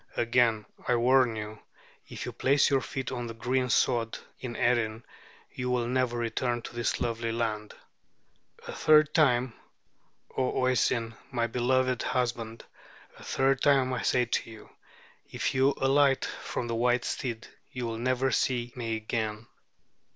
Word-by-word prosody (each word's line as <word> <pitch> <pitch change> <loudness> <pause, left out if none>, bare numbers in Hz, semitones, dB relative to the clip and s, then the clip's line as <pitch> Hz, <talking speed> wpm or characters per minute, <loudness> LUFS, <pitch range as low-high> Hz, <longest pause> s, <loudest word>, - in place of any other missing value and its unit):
Again 115 -2 +2 0.2
I 125 - +3
warn 125 0 +4
you, 105 0 -6 0.5
if - - -7
you - - -4
place 140 +2 +2
your 135 -1 +3
feet 130 -1 -4
on 120 -2 -4
the 115 - -7
green 125 +2 0
sod 115 -2 +1 0.2
in 120 -2 -6
Erin, 115 -2 0 0.5
you 125 -1 -3
will 125 -1 +1
never 125 0 0
return 120 0 -1
to - - -8
this 120 -1 -1
lovely 115 -1 -2
land. 110 -2 -3 0.9
A - - -4
third 155 0 +4
time, 125 -6 +3 0.8
O 130 - 0
Oisin, 120 -2 +1 0.2
my 120 -2 0
beloved 125 +1 +1
husband, 115 -2 -2 0.5
a - - -12
third 135 0 +1
time 135 -3 +3
I 125 - -2
say 125 -1 +2
to 115 - -2
you, 110 -1 -13 0.6
if - - -2
you 135 +1 +3
alight 135 0 +3
from 125 - -5
the 115 - -3
white 120 +1 +1
steed 115 -4 -3 0.3
you 125 -1 -4
will 115 -1 -4
never 130 +2 +1
see 120 -2 0
me 115 -3 -2
again." 110 0 -3
120 Hz, 150 wpm, -28 LUFS, 115-130 Hz, 0.9 s, warn